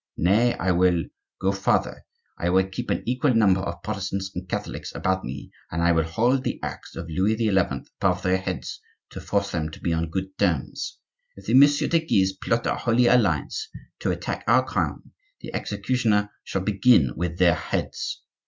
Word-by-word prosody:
Nay, 110 +8 +3
I 95 - 0
will 90 -1 +3 0.4
go 95 0 +1
farther; 95 0 0 0.4
I 85 - 0
will 95 +1 +3
keep 120 +6 -6
an - - -1
equal 125 +1 +1
number 100 -4 +4
of 85 -1 -5
Protestants 100 -2 -3
and 90 +1 -7
Catholics - - -4
about 95 0 0
me, - - -7 0.2
and 85 +1 -1
I 85 - +4
will 80 -2 +2
hold 120 +11 +1
the - - -3
axe - - -6
of 85 - -6
Louis 95 +7 +1
XI. 110 -3 +1
above 90 - -1
their 90 0 +2
heads 95 - -5 0.3
to - - -7
force 100 -1 -1
them 80 -3 -2
to 80 - -11
be 85 - -1
on 80 0 -1
good 95 +2 -4
terms. 85 -9 -1 0.4
If 100 - -14
the 115 - -1
Messieurs 145 +2 +5
de 165 - +5
Guise 95 -12 +2
plot 115 +4 -1
a - - +1
Holy 120 +1 +2
Alliance 105 - +2 0.3
to - - -1
attack - - -3
our - - +4
crown, - - -3 0.3
the - - -9
executioner 105 -1 0
shall 95 - -3
begin 100 - +3
with 85 0 -3
their 90 -2 +5
heads. - - -3
95 Hz, 185 wpm, -24 LUFS, 90-115 Hz, 0.4 s, Messieurs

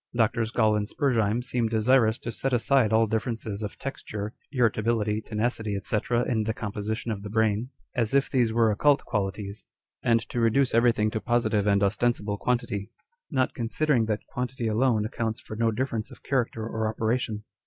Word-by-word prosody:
Drs. 115 -1 +1
Gall 110 -2 +3
and 105 0 -1
Spurzheim 120 -5 +1
seem 120 -2 0
desirous 110 0 +3
to 115 - -5
set 135 +3 -2
aside 125 -1 +3
all 110 +1 +4
differences 110 -1 -3
of 105 - -5
texture, 110 -6 -5 0.2
irritability, 110 -4 +1
tenacity, 110 -2 -2
&c. 105 - -1 0.3
in 115 -3 +1
the 110 0 -1
composition 110 +1 -3
of 100 -2 -4
the 105 - -7
brain, 110 +2 +1 0.2
as 115 +1 0
if 140 - +4
these 120 -4 +2
were 115 -1 +3
occult 145 +7 +3
qualities, 100 0 -3 0.3
and 115 -1 +3
to 120 - -2
reduce 120 +3 +3
everything 115 -2 +3
to 110 - -2
positive 120 -4 +1
and 100 0 +3
ostensible 105 0 0
quantity; 115 -5 -1 0.4
not 130 -5 +1
considering 120 +2 +1
that 105 -1 -2
quantity 125 -1 -4
alone 110 0 +2
accounts 110 +1 -3
for 110 - -8
no 115 +1 +2
difference 115 -2 -2
of - - -15
character 120 -4 -1
or 110 -1 -2
operation. 110 -1 -1
115 Hz, 170 wpm, -27 LUFS, 105-120 Hz, 0.4 s, all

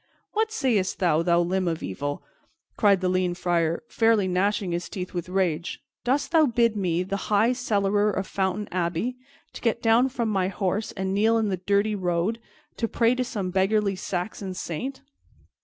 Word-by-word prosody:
"What 440 +1 0
sayest 240 - 0
thou, 170 -4 +2
thou 170 0 +3
limb 185 +1 0
of 165 -1 -2
evil!" 145 +10 -4 0.5
cried 200 -4 +4
the 185 - +1
lean 180 -1 +1
Friar, 170 -1 0
fairly 225 -4 +3
gnashing 190 +1 0
his 170 0 -3
teeth 180 -2 -6
with 175 -1 -4
rage. 180 -3 -1 0.2
"Doss 265 +4 +1
thou 320 -3 +4
bid 235 -2 +2
me, 180 -3 0
the 195 +1 -4
high 215 +4 +4
cellarer 205 -4 +1
of 195 -1 -2
Fountain 195 +2 -1
Abbey, 180 +7 -1 0.4
to - - -9
get 230 -1 +1
down 235 +3 +4
from 240 -3 -2
my 190 -3 +1
horse 195 +2 -2
and 190 -1 -2
kneel 220 +3 +3
in 220 -2 +1
the 190 - -1
dirty 200 +4 +1
road 185 +3 -1 0.4
to 230 - 0
pray 230 +1 +2
to 255 0 0
some 200 -6 -3
beggarly 195 +1 +2
Saxon 185 +1 -4
saint?" 255 - -5
195 Hz, 175 wpm, -25 LUFS, 180-225 Hz, 0.5 s, cried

